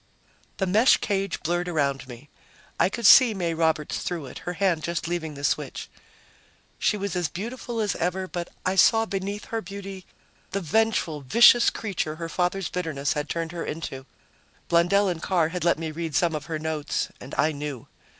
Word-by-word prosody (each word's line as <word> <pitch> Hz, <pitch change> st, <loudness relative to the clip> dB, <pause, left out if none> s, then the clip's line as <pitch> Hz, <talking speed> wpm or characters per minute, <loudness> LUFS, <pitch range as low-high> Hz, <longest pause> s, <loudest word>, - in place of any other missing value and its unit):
The 190 Hz, -, 0 dB
mesh 215 Hz, +7 st, +5 dB
cage 195 Hz, -4 st, -2 dB
blurred 175 Hz, +2 st, -1 dB
around 140 Hz, -6 st, -1 dB
me. 125 Hz, +3 st, -11 dB, 0.5 s
I -, -, +4 dB
could 235 Hz, +3 st, -4 dB
see 235 Hz, -1 st, +8 dB
May 170 Hz, -3 st, -1 dB
Roberts 160 Hz, -2 st, 0 dB
through 170 Hz, -5 st, -4 dB
it, 130 Hz, -, -9 dB
her -, -, -2 dB
hand 180 Hz, -3 st, +1 dB
just 170 Hz, +2 st, -3 dB
leaving 165 Hz, -3 st, -3 dB
the 140 Hz, -, -9 dB
switch. -, -, -2 dB, 0.9 s
She 210 Hz, -, +2 dB
was 200 Hz, -2 st, -3 dB
as 175 Hz, -4 st, 0 dB
beautiful 230 Hz, -, -5 dB
as 210 Hz, -2 st, 0 dB
ever, 185 Hz, +2 st, -1 dB
but 175 Hz, -1 st, -5 dB, 0.2 s
I 185 Hz, -, +2 dB
saw 225 Hz, +3 st, +5 dB
beneath 200 Hz, 0 st, -4 dB
her 225 Hz, -, 0 dB
beauty 195 Hz, -1 st, -8 dB, 0.5 s
the 200 Hz, -, 0 dB
vengeful, 180 Hz, -4 st, 0 dB
vicious 235 Hz, -, +6 dB
creature 180 Hz, -7 st, -3 dB
her 165 Hz, 0 st, -6 dB
father's 180 Hz, +1 st, -1 dB
bitterness 155 Hz, -6 st, -2 dB
had 150 Hz, 0 st, -3 dB
turned 165 Hz, -1 st, -3 dB
her 170 Hz, -1 st, -4 dB
into; 135 Hz, -4 st, -6 dB, 0.6 s
Blundell 175 Hz, +4 st, +4 dB
and 175 Hz, -3 st, -2 dB
Carr 170 Hz, -4 st, +1 dB
had 180 Hz, 0 st, -4 dB
let 170 Hz, -2 st, +3 dB
me 160 Hz, -1 st, -4 dB
read 160 Hz, -1 st, -4 dB
some 170 Hz, 0 st, +2 dB
of 150 Hz, -1 st, -4 dB
her 160 Hz, -2 st, -2 dB
notes, 155 Hz, -1 st, -2 dB
and 130 Hz, -, -9 dB
I 155 Hz, -, +3 dB
knew. 145 Hz, -4 st, -6 dB
175 Hz, 185 wpm, -25 LUFS, 155-195 Hz, 0.9 s, see